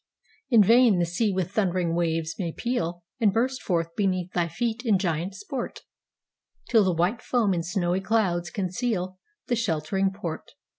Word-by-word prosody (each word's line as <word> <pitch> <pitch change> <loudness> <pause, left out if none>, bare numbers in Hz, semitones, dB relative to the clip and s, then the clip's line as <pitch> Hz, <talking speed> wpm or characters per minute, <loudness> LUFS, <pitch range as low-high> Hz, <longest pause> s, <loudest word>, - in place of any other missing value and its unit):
In 230 -5 +7
vain 230 -1 +5
the 175 - +2
sea 200 +6 0
with 185 -2 -2
thundering 180 -5 0
waves 165 -1 0
may 170 -4 -2
pealAnd 175 -6 -2 0.3
burst 255 +3 0 0.3
beneath 185 -3 0
thy 175 -1 +1
feet 230 +7 -2
in 220 -6 +3
giant 180 0 -2
sport, 235 +6 -5 0.9
Till 225 -3 +5
the 190 - +2
white 180 +8 +1
foam 225 -6 +1
in 170 - 0
snowy 175 +1 -1
clouds 190 -5 +1
concealThe 190 - -3
sheltering 190 -2 0
port. 180 -5 -6
190 Hz, 145 wpm, -26 LUFS, 175-225 Hz, 0.9 s, In